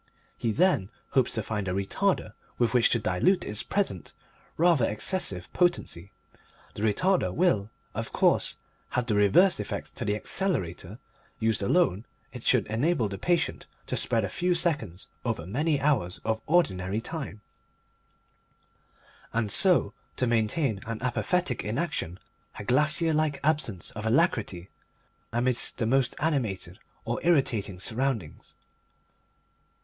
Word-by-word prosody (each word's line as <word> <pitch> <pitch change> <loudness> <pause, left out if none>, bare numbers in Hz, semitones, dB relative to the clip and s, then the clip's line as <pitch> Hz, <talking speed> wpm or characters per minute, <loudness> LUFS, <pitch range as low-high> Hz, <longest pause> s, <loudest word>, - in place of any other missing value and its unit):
He 115 - -1
then 160 - +2 0.2
hopes 130 -3 +1
to 110 - -1
find 105 -2 -3
a 90 - -1
Retarder 180 - 0 0.2
with 120 0 +1
which 125 -2 +5
to - - +2
dilute 115 - +1
its 105 0 0
present 195 - -2 0.4
rather 165 -7 +4
excessive 105 - -2
potency. 140 - 0 0.6
The - - -7
Retarder 180 - +2
will, 165 - +1 0.2
of - - -4
course, - - +2 0.3
have 125 - -1
the 115 - 0
reverse 105 - +5
effect - - -5
to - - -2
the 105 -2 0
Accelerator; 105 - -2 0.4
used 110 -2 +1
alone 100 - +2 0.3
it - - -7
should - - +3
enable 120 +1 0
the 95 -1 -6
patient 175 -2 0 0.2
to - - -3
spread 115 -3 0
a - - -4
few 180 - 0
seconds 130 - -1 0.2
over 115 -9 -2
many 145 - 0
hours 120 -12 +1
of 110 0 0
ordinary 100 - +2
time, 135 -5 -6 1.9
and 110 -3 0
so 180 - +3 0.2
to 125 - 0
maintain 115 0 +1
an 115 -1 -4
apathetic 130 - 0
inaction, 110 - -2 0.4
a - - -6
glacier 150 +7 +3
like 150 -2 +1
absence 140 - 0
of 110 0 -5
alacrity, 110 - +1 0.6
amidst 120 +1 +1
the 115 - 0
most 130 +2 +2
animated 110 - -1 0.3
or - - -2
irritating 120 - +1
surroundings. 115 - -2
115 Hz, 135 wpm, -27 LUFS, 105-160 Hz, 1.9 s, which